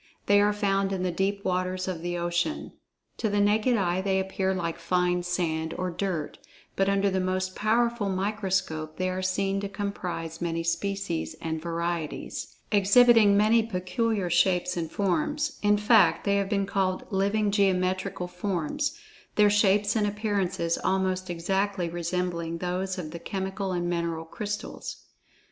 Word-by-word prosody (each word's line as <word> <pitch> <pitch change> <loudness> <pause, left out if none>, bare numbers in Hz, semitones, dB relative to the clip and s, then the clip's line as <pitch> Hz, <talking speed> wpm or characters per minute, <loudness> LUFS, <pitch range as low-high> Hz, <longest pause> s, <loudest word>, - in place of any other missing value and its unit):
They 205 0 +5
are 205 0 +4
found[Pg 205 -1 0 0.2
46] - - -3
in 185 - -3
the 180 - 0
deep 195 +3 -1
waters 185 0 -1
of 180 -3 -3
the 175 0 -2
ocean. 175 - -1 0.5
To 220 - 0
the 205 0 +1
naked 215 +4 +3
eye 180 -2 +1
they 190 0 +1
appear 190 0 -1
like 170 -3 -2
fine 180 +1 +1
sand 165 -2 -2
or 185 0 -2
"dirt," 170 -4 -3 0.4
but 195 0 +2
under 200 0 +2
the 190 - 0
most 185 0 -1
powerful 230 -1 +1
microscope, 190 -5 -1
they 185 0 0
are 185 0 -3
seen 195 +1 0
to 200 0 -4
comprise 180 -5 -4
many 165 -1 -1
species 170 - -2
and 160 -1 -3
varieties, 170 -1 -4 0.2
exhibiting 210 +1 +6
many 220 +3 +5
peculiar 210 -1 -1
shapes 180 +1 +2
and 165 -2 -3
forms—in 205 - +1
fact, 210 +1 +4
they 200 0 +2
have 200 -1 0
been 200 -2 +1
called 190 -2 -1
"living 200 +2 +1
geometrical 185 -2 +1
forms," 185 - -2 0.4
their 210 -1 +5
shapes 205 0 +3
and 210 -2 +2
appearances 200 -5 -1
almost 185 -1 0
exactly 190 +2 -1
resembling 170 -1 -2
those 185 +2 -2
of 160 -4 -5
the 170 - -7
chemical 190 +1 -3
and 175 -1 -1
mineral 170 -2 -2
crystals. 210 +5 -6
190 Hz, 155 wpm, -27 LUFS, 175-205 Hz, 0.5 s, exhibiting